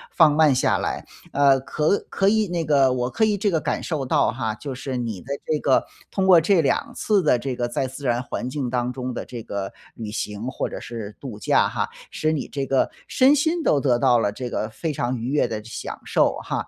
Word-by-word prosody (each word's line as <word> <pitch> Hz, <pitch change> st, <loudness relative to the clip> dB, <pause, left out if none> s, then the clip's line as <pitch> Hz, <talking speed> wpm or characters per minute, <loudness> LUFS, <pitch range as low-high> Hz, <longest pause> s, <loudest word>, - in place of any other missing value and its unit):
放 160 Hz, -4 st, +6 dB
慢 155 Hz, -2 st, +5 dB
下 130 Hz, -, +2 dB
来， -, -, -3 dB, 0.3 s
呃， 140 Hz, -1 st, +5 dB
可 155 Hz, +8 st, +1 dB
可 195 Hz, 0 st, +2 dB
以 215 Hz, 0 st, +2 dB
那 175 Hz, -2 st, -2 dB
个 140 Hz, -4 st, +3 dB
我 125 Hz, -1 st, -1 dB
可 220 Hz, +10 st, +2 dB
以 210 Hz, -1 st, +1 dB
这 205 Hz, +1 st, +1 dB
个 165 Hz, -4 st, +1 dB
感 -, -, -2 dB
受 150 Hz, -5 st, -2 dB
到 -, -, +2 dB
哈， 110 Hz, -3 st, -2 dB
就 135 Hz, +3 st, -6 dB
是 130 Hz, 0 st, -4 dB
你 115 Hz, -5 st, -3 dB
的 140 Hz, -, -5 dB, 0.2 s
这 155 Hz, -, +1 dB
个 135 Hz, -3 st, +3 dB, 0.3 s
通 190 Hz, -1 st, 0 dB
过 180 Hz, -3 st, +8 dB
这 170 Hz, +2 st, +3 dB
两 145 Hz, -, 0 dB
次 205 Hz, -3 st, +1 dB
的 125 Hz, -5 st, +3 dB
这 130 Hz, +1 st, -3 dB
个 120 Hz, -1 st, -1 dB
在 120 Hz, +2 st, -2 dB
自 135 Hz, +2 st, -9 dB
然 120 Hz, -1 st, +1 dB
环 125 Hz, 0 st, -4 dB
境 130 Hz, -2 st, -3 dB
当 125 Hz, 0 st, -1 dB
中 125 Hz, -1 st, -4 dB
的 -, -, -5 dB
这 120 Hz, -2 st, -7 dB
个 100 Hz, -2 st, -5 dB, 0.2 s
旅 110 Hz, -2 st, -6 dB
行 105 Hz, +1 st, -4 dB
或 130 Hz, -, -3 dB
者 -, -, -6 dB
是 110 Hz, -3 st, -7 dB
度 120 Hz, -7 st, -8 dB
假 -, -, +3 dB
哈， -, -, -2 dB, 0.2 s
使 155 Hz, -, 0 dB
你 155 Hz, -3 st, -2 dB
这 140 Hz, -2 st, -3 dB
个 135 Hz, -, +2 dB, 0.2 s
身 270 Hz, +3 st, +5 dB
心 320 Hz, +3 st, +1 dB
都 145 Hz, -, +3 dB
得 130 Hz, -3 st, +2 dB
到 125 Hz, -2 st, +4 dB
了 105 Hz, -3 st, +1 dB
这 125 Hz, +4 st, -5 dB
个 110 Hz, -, -2 dB
非 150 Hz, +8 st, -4 dB
常 125 Hz, -1 st, -1 dB
愉 120 Hz, +2 st, -4 dB
悦 145 Hz, +2 st, +2 dB
的 110 Hz, -, -4 dB
这 105 Hz, -, -13 dB
享 -, -, -6 dB
受 -, -, +2 dB
哈。 -, -, -3 dB
135 Hz, 260 characters per minute, -23 LUFS, 120-155 Hz, 0.3 s, 过